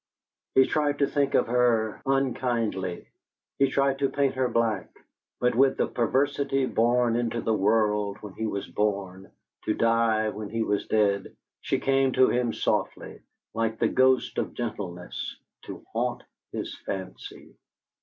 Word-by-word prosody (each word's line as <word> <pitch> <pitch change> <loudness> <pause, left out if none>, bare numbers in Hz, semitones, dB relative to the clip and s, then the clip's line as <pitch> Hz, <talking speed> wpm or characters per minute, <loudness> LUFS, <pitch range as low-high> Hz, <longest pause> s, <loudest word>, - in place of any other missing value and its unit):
He 130 - +7
tried 145 -2 0
to 140 - +3
think 140 0 0
of - - +4
her 115 -3 +1
unkindly, 120 -8 -1 0.5
he 135 -1 +4
tried 135 0 +1
to 140 -1 +2
paint 140 -1 +1
her 130 -1 +1
black; 115 -3 0 0.5
but 125 0 +2
with 135 +2 +3
the - - +2
perversity 135 +2 0
born 120 0 +2
into 120 -1 -1
the 115 - 0
world 105 0 +1
when 105 -3 -9
he 110 - -3
was 100 -2 -4
born, 100 -2 -2 0.3
to 105 - +1
die 115 -1 +2
when 105 -1 -6
he 115 +2 -1
was 105 -2 -1
dead, 100 -2 +1 0.3
she - - -1
came 135 -1 +2
to 130 0 +5
him 120 -1 +1
softly, - - -2 0.3
like 115 0 -1
the - - +2
ghost 130 0 +2
of - - -3
gentleness, 95 -7 -5 0.3
to - - -9
haunt - - -1 0.3
his - - -5
fancy. 95 -1 -7
115 Hz, 150 wpm, -26 LUFS, 105-130 Hz, 0.5 s, He